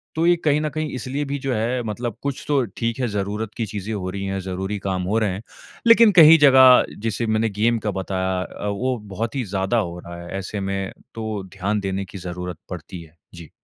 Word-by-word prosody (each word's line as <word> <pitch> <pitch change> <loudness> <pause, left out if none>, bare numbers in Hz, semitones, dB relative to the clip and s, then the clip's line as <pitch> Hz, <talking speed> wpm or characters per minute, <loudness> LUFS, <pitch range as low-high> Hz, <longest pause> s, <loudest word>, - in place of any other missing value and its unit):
तो 160 +1 +1
ये 175 - +6
कहीं 150 -1 +4
न 155 - -1
कहीं 155 +1 -3
इसलिए 130 +4 -3
भी 140 0 -3
जो 135 -1 0
है, 120 +3 0
मतलब 115 +1 -4
कुछ 140 -2 -3
तो 140 -3 +2
ठीक 115 +1 -2
है, 125 - +1
ज़रूरत 105 +1 -3
की 115 - -1
चीज़ें 105 +1 -5
हो 95 -3 -3
रही 100 +1 -5
हैं, 95 0 -2
ज़रूरी 95 +2 -3
काम 95 -1 -2
हो - - +3
रहे 110 -2 +1
हैं। 95 - -6 0.5
लेकिन 230 -1 +8
कई 160 +1 +10
जगह, 130 -2 +8 0.2
जैसे 115 +2 -1
मैंने 110 +1 +1
गेम 115 +1 +3
का - - +1
बताया, 95 -1 -1
अ, 105 - -7
वो 125 +5 -1 0.2
बहुत 115 +4 -3
ही 135 - 0
ज़्यादा 95 +5 +1
हो 90 -5 -2
रहा 85 0 -9
है 85 - -10
ऐसे 100 +2 -5
में, 95 0 -3 0.2
तो 110 -3 -4
ध्यान 100 +2 -1
देने 95 0 -3
की 95 - -10
ज़रूरत 90 -1 -5
पड़ती 90 0 -7
है। 80 0 -19 0.2
जी। 85 -3 -11
105 Hz, 225 wpm, -22 LUFS, 95-125 Hz, 0.5 s, कई